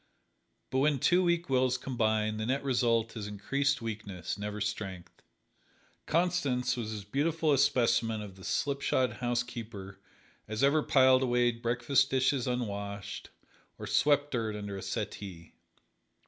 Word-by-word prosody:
But 130 - +1
when 145 +1 +3
two 175 +7 +3
weak 170 -1 +1
wills 130 -1 +2
combine, 110 -4 0
the 110 +1 -3
net 135 +2 0
result 115 -4 +1
is 105 -2 -5
increased 140 +7 -1
weakness 100 -6 -5
never 105 +1 -5
strength. 100 -3 -5 0.9
Constance 145 -7 +1
was 115 -3 -4
as 105 -2 -5
beautiful 150 +7 +1
a - - +3
specimen 115 -3 +2
of 105 -3 -8
the 95 - -14
slipshod 140 -1 0
housekeeper 115 -5 -4 0.5
as 110 +4 -2
ever 145 +3 +4
piled 130 -2 +5
away 120 -1 +3
breakfast 125 +4 +1
dishes 130 -1 +1
unwashed, 100 -5 -4 0.5
or - - -7
swept 145 0 +2
dirt 110 -4 -1
under 100 -1 -5
a 95 - -6
settee. 85 -5 -6
120 Hz, 135 wpm, -30 LUFS, 105-135 Hz, 0.9 s, piled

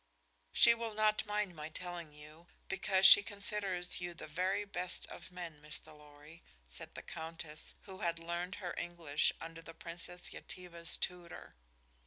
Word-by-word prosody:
"She 235 - +8
will 230 -2 -3
not 215 0 +3
mind 210 -3 0
my 155 0 -5
telling 175 -1 -5
you, 150 +3 -13 0.2
because 190 0 +3
she 205 - +12
considers 200 -4 0
you 175 -1 -3
the - - -7
very 185 +6 +1
best 180 -2 -2
of - - -10
men, 170 -4 -6
Mr. 150 0 -5
Lorry," 150 +2 -14 0.3
said - - -9
the - - -6
Countess, 160 -1 -7
who 190 -1 -9
had 170 -1 +1
learned 170 +2 -3
her 180 -4 -4
English 170 -4 +1
under 165 0 -7
the 165 0 -10
Princess 175 +2 -5
Yetive's 170 -2 -3
tutor. 175 -1 -4
175 Hz, 155 wpm, -36 LUFS, 165-190 Hz, 0.3 s, she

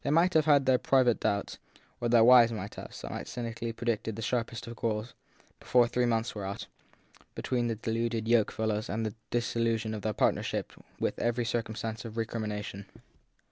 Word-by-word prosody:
They - - -1
might 170 +5 +4
have 155 -2 +4
had 145 -3 +5
their 130 -1 +4
private 130 -4 +3
doubts 100 0 -1 0.4
or 120 - -1
their 115 -1 +6
wives 120 -1 +8
might 105 -3 -5
have; - - -9 0.2
might - - -5
cynically 115 -1 -4
have 115 - -4
predicted 115 -2 -2
the 115 - -5
sharpest 120 0 -2
of 115 0 -8
quarrels, 110 +1 -2 0.5
before 120 -1 +4
three 125 +1 +1
months 115 0 0
were 105 - -5
out, 95 +1 -5 0.7
between 120 -2 -1
the 115 - -1
deluded 115 0 -2
yoke 115 -2 +3
fellows, 110 -1 -2
and 110 +2 -1
the 110 - -3 0.2
dissolution 115 -2 0
of 105 - -4
the 110 - -1
partner - - +2
ship - - -3 0.3
with - - -1
every 120 0 0
circumstance 115 -1 -3
of 115 -1 -8
recrimination. 105 -3 -4
115 Hz, 185 wpm, -30 LUFS, 110-120 Hz, 0.7 s, wives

